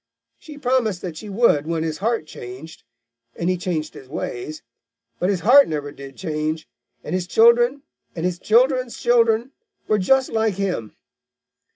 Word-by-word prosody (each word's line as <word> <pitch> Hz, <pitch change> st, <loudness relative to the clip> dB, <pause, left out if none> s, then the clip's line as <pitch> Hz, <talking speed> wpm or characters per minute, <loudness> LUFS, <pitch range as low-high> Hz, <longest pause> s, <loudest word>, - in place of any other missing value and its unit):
She 300 Hz, -2 st, -12 dB
promised 245 Hz, -8 st, 0 dB
that 175 Hz, -4 st, -5 dB
she 210 Hz, +5 st, -8 dB
would 195 Hz, -8 st, +2 dB
when 165 Hz, -1 st, -1 dB
his 160 Hz, -1 st, -3 dB
heart 225 Hz, -4 st, 0 dB
changed, 135 Hz, +3 st, -10 dB, 0.5 s
and 170 Hz, +2 st, 0 dB
he -, -, +1 dB
changed 170 Hz, -3 st, -3 dB
his 130 Hz, -, -13 dB
ways. 150 Hz, +2 st, -5 dB, 0.6 s
But 180 Hz, -, +1 dB
his 190 Hz, -3 st, 0 dB
heart 275 Hz, +5 st, +7 dB
never 145 Hz, -2 st, -4 dB
did 135 Hz, -1 st, -11 dB
change, 155 Hz, -2 st, -3 dB, 0.4 s
and -, -, -5 dB
his 180 Hz, -1 st, -1 dB
children 240 Hz, +6 st, +4 dB, 0.3 s
and 165 Hz, 0 st, -3 dB
his 180 Hz, -1 st, -1 dB
children's 250 Hz, +3 st, +2 dB
children 235 Hz, +1 st, +2 dB, 0.4 s
were 215 Hz, -, +2 dB
just 265 Hz, +7 st, +2 dB
like 220 Hz, -3 st, +1 dB
him. 180 Hz, -, -3 dB
185 Hz, 160 wpm, -22 LUFS, 155-235 Hz, 0.6 s, heart